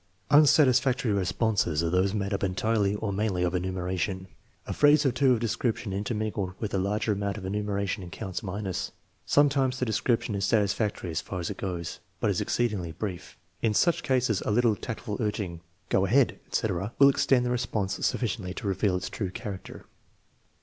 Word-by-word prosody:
Unsatisfactory 130 -5 +5
responses 95 -4 +1
are 85 - 0
those 95 +2 +2
made 100 -1 -2
up 100 - -2
entirely 100 +2 +1
or 105 -1 -3
mainly 95 -3 0
of 90 0 0
enumeration. 95 +1 -2 0.4
A - - -4
phrase 145 0 +5
or 135 - +4
two 130 +1 +3
of 120 - 0
description 115 -2 -1
intermingled 105 -2 -2
with 110 - -4
a 95 - +1
larger 105 +3 0
amount 100 0 -2
of 95 - -7
enumeration 100 -1 -2
counts 95 +2 -5
minus. 95 -2 -4 0.3
Sometimes 135 -3 +3
the 125 - 0
description 115 0 0
is 100 -1 -2
satisfactory 105 -3 0
as 80 - -1
far 90 - -5
as 85 - -3
it 100 - -7
goes, 90 -4 -4 0.2
but - - +1
is - - 0
exceedingly 105 -9 -1
brief. 90 0 -6 0.2
In 110 -2 +1
such 170 - +3
cases 125 -6 +1
a - - -3
little 115 0 +3
tactful 110 0 -5
urging 100 -6 -2
(" - - -39
Go 95 - +3
ahead" 125 +5 +3
etc.) 100 0 -1
will 140 0 +8
extend 130 -2 +3
the 125 - 0
response 110 -5 -2
sufficiently 100 -6 -1
to 110 - -7
reveal 95 0 +1
its 90 - -4
true 100 -4 -3
character. 95 +1 -7
105 Hz, 175 wpm, -27 LUFS, 95-120 Hz, 0.4 s, will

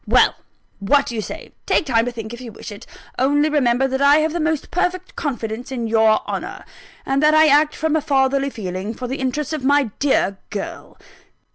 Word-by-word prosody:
Well, - - +4 0.5
what 275 +8 +3
do - - -5
you 220 - -2
say? - - -8 0.2
take - - +2
time 230 -4 +2
to 245 - -2
think, 225 -1 -7
if 240 - -9
you 240 -3 -8
wish 220 - -10
it 205 - -11 0.3
only 290 +3 +3
remember 270 -3 +2
that 265 +1 -2
I 280 +1 +6
have 310 0 +1
the 345 - -2
most 315 -2 -1
perfect 360 +1 -2
confidence 245 -4 -4
in 240 -3 -3
your 220 -1 +3
honour, - - -5 0.4
and 270 +1 0
that 305 0 +4
I 315 0 +7
act 300 +1 +4
from 315 0 0
a 315 - +2
fatherly 275 0 +1
feeling 200 -2 -5
for 250 - -5
the 265 +3 -3
interests 265 +4 -2
of 305 -4 -4
my 280 -4 +2
dear 200 -8 +1
girl!" 200 - -7
265 Hz, 210 wpm, -20 LUFS, 230-295 Hz, 0.5 s, I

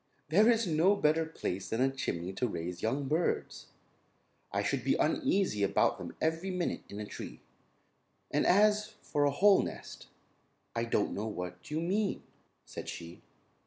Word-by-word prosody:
"There 210 +8 +5
is 230 -1 +3
no 175 +4 +3
better 160 -3 +2
place 95 - -4
than 115 - -1
a 135 +1 +3
chimney 95 -9 -3
to 125 +6 0
raise 85 -2 -5
young 135 +5 -1
birds. 160 +5 -1 0.8
I - - 0
should - - -1
be - - +2
uneasy 195 - +1
about 100 0 +2
them - - -7
every 160 +4 0
minute 180 -2 -2
in 100 - -7
a 105 - -4
tree. - - -8 0.9
And - - +2
as 210 +2 +4
for 145 -1 +1
a - - +4
whole 195 +7 +5
nest, - - -7 0.7
I 115 0 0
don't 115 -3 0
know 105 +2 -3
what 90 -3 -6
you 150 +1 -1
mean," 195 +4 0 0.4
said - - -7
she. 85 +1 -8
150 Hz, 165 wpm, -31 LUFS, -, 0.9 s, There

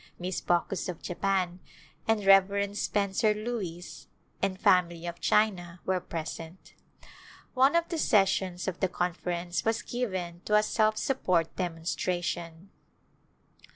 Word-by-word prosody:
Miss 180 +1 -3
Baucus 175 +2 0
of 175 - -7
Japan, 185 -1 -1 0.5
and 220 -2 +1
Rev. 200 +1 +4
Spencer 205 +1 +1
Lewis 210 -6 -5 0.3
and 190 -1 -1
family 175 -3 +3
of 170 0 -6
China, 185 -5 +1
were 185 -1 +1
present. 165 0 -7 0.8
One 265 +4 +4
of 340 0 +2
the 335 -2 -2
sessions 190 -6 +2
of 185 -2 -3
the 190 - +2
Conference 175 0 -2
was 225 0 0
given 185 -8 -3
to 210 - +2
a 210 - +5
self 215 0 +2
support 180 - 0
demonstration. 175 0 -3
185 Hz, 120 wpm, -29 LUFS, 175-210 Hz, 0.8 s, a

